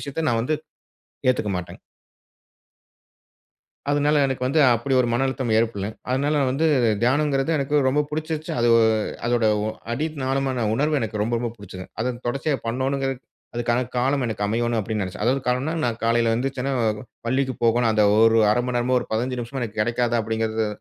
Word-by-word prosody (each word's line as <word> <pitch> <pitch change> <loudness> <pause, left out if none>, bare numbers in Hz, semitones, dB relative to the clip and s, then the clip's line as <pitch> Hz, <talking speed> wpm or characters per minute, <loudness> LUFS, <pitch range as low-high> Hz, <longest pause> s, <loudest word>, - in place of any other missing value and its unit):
விஷயத்த 155 +3 -3
நான் 115 -1 +1
வந்து 155 +5 0 0.7
ஏத்துக்கமாட்டேங்க. 100 -8 -2 2.1
அதனால 145 +1 +2
எனக்கு 130 -1 -3
வந்து 150 +4 +2
அப்டி 120 +4 0
ஒரு 120 - +1
மன 125 +3 +1
அழுத்தம் 130 -3 -2
ஏற்படலங். 110 -2 -1 0.2
அதனால 140 +4 +1 0.2
வந்து 145 +5 +1 0.4
தியானம்ங்கறது 135 +2 +2
எனக்கு 145 +2 0
ரொம்ப 145 +3 +2
புடிச்சிருச்சு. 155 0 -3
அது 120 - +3 0.6
அதோட 120 -1 +1 0.5
அடி 150 +6 -1 0.2
நாளமான 130 -3 0
உணர்வு 150 +4 +1
எனக்கு 110 -2 -3
ரொம்ப 115 +3 -1
ரொம்ப 120 0 -2
புடிச்சுது. 95 -2 -9 0.2
அத 125 +2 -1
தொடர்ச்சியா 135 +3 -1
பண்ணனுங்கிறது 135 +3 -1 0.4
அதுக்கான 120 +1 0
காலம் 135 +3 +1
எனக்கு 105 -2 -2
அமையணும் 120 +2 0
அப்டின்னு 105 0 -2
நெனைச்சேன். 95 +2 -5
அதாவது 135 +3 +2
காலம்ன்னா, 125 +5 0
நான் 120 -2 -1
காலையில 115 0 +2
எந்திரிச்சனா 135 +2 -2 0.5
பள்ளிக்கு 130 +1 0
போகணும் 115 0 +3
அந்த 105 -1 +3 0.2
ஒரு 115 0 +5
1/2 105 - +2
மணநேரமோ 125 0 +1
ஒரு - - -6
15 125 +3 -1
நிமிஷமோ 120 +2 -5
எனக்கு 110 -2 -3
கிடைக்காதா 120 +1 +1
அப்டிங்கிறது 110 0 -1
120 Hz, 155 wpm, -23 LUFS, 115-135 Hz, 2.1 s, ஒரு